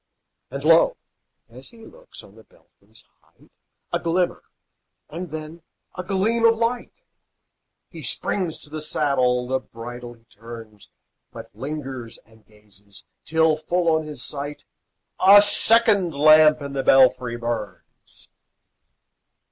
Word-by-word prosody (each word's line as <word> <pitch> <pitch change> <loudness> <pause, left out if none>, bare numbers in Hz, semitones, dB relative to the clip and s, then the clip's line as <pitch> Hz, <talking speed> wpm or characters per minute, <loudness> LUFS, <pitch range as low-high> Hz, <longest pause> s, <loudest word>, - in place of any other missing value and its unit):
And 140 +2 -7
lo! 165 +1 +4 0.5
as 125 +3 -13
he 225 -1 -16
looks, - - -15
on - - -17
the - - -18
belfry's - - -25 0.2
height - - -27 0.4
A - - +1
glimmer, 175 +1 -1 0.7
and 175 +3 -6
then 155 +2 -8 0.3
a 185 - -4
gleam 210 +5 -1
of 230 0 +4
light! 235 +1 -2 1.0
He - - -11
springs 180 -5 -3
to 145 - -15
the 155 0 -6
saddle, 125 -5 0
the 130 +1 -1
bridle 120 +1 -10
he 115 - -28
turns, 115 -1 -13 0.4
But - - -11
lingers 130 -2 -7
and 110 0 -23
gazes, 105 -2 -19 0.2
till 160 0 +2
full 165 +1 0
on 160 -1 -3
his 145 -5 -8
sight 145 0 -6 0.6
A 200 +2 +9
second 205 - +3
lamp 155 0 +5
in 140 0 -7
the 135 - -1
belfry 130 -2 +3
burns! 115 -3 -8
150 Hz, 130 wpm, -22 LUFS, 120-175 Hz, 1.0 s, A